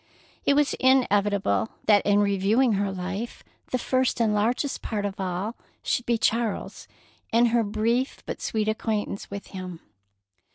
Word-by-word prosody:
It 280 - +5
was 295 0 +3
inevitable 205 - +2
that 205 -2 +5
in 205 0 +4
reviewing 205 +5 +2
her 200 0 0
life 190 +5 -5 0.3
the 255 - 0
first 255 0 0
and 220 -2 +2
largest 235 +7 0
part 210 -3 -2
of 200 -1 -4
all 190 +4 -2 0.3
should 245 - -1
be 235 -1 +2
Charles 225 -1 -1 0.4
and 235 +1 +4
her 235 0 +3
brief 225 +5 -1
but - - -5
sweet 215 -1 -1
acquaintance 215 -2 -2
with 200 0 -7
him. 185 -3 -6
215 Hz, 150 wpm, -26 LUFS, 200-235 Hz, 0.4 s, It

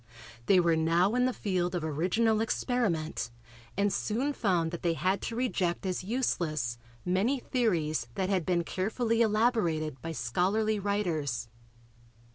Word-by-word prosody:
They 190 - +6
were 170 -2 +3
now 165 +5 +3
in 250 0 +3
the 255 - +2
field 185 -6 -1
of 175 - -2
original 185 +9 +1
experiment 210 - -1 0.5
and 200 0 +2
soon 255 +7 -1
found 175 -9 +1
that 170 - -5
they 170 -1 +1
had 185 +5 0
to 230 - -4
reject 200 -8 -1
as 185 -1 -2
useless 160 - -1 0.3
many 195 +10 +2
theories 170 - 0
that 190 - 0
had 190 -3 +1
been 175 0 +1
carefully 225 +6 0
elaborated 210 - +1
by 165 0 -4
scholarly 190 - 0
writers. 160 - -1
185 Hz, 140 wpm, -30 LUFS, 165-220 Hz, 0.5 s, They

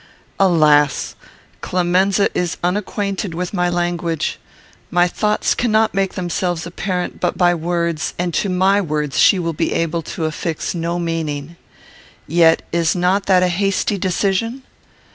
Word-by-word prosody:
Alas! 150 -6 +3 0.5
Clemenza 185 +3 +2
is 175 -1 -1
unacquainted 200 0 -2
with 180 +2 -4
my 180 -2 +1
language. 175 -2 -2 0.5
My 175 0 +3
thoughts 210 +4 0
cannot 220 -2 +1
make 195 -1 -1
themselves 175 -1 -2
apparent 180 +1 -3
but - - -1
by 175 -1 +4
words, 170 -1 -2
and 175 -1 -2
to 200 - 0
my 190 +2 +3
words 150 -6 -2
she 195 - +6
will 165 -2 -2
be 150 - -1
able 165 0 -1
to 160 +1 -5
affix 155 +1 -3
no 170 0 -2
meaning. 165 -2 -3 0.7
Yet 165 0 +4
is 170 0 +1
not 185 +3 +1
that 185 -2 +4
a - - +3
hasty 195 +2 0
decision? 200 +7 -1
175 Hz, 140 wpm, -19 LUFS, 165-190 Hz, 0.7 s, she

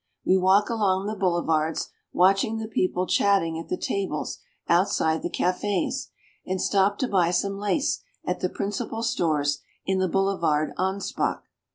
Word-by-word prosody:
We 185 - +4
walk 190 +2 +4
along 195 -4 +1
the 215 +1 -2
boulevards, 170 -4 0 0.2
watching 195 +5 +3
the 220 0 -4
people 185 -4 0
chatting 175 -5 +2
at 165 - -8
the 180 - -1
tables 190 -7 -3 0.3
outs 175 +4 +3
ide 160 0 +1
the - - -3
cafes; 185 +3 -1 0.3
and 185 0 -2
stop 200 +1 +2
to 260 - 0
buy 180 -6 +2
some 195 +3 -1
lace 210 +8 0 0.2
at - - -1
the - - 0
principal 210 +3 -3
stores 155 - 0 0.2
in 190 0 +1
the 185 -1 +1
Boulevard 170 -6 +1
Anspach. 190 +2 -1
190 Hz, 155 wpm, -25 LUFS, 170-200 Hz, 0.3 s, We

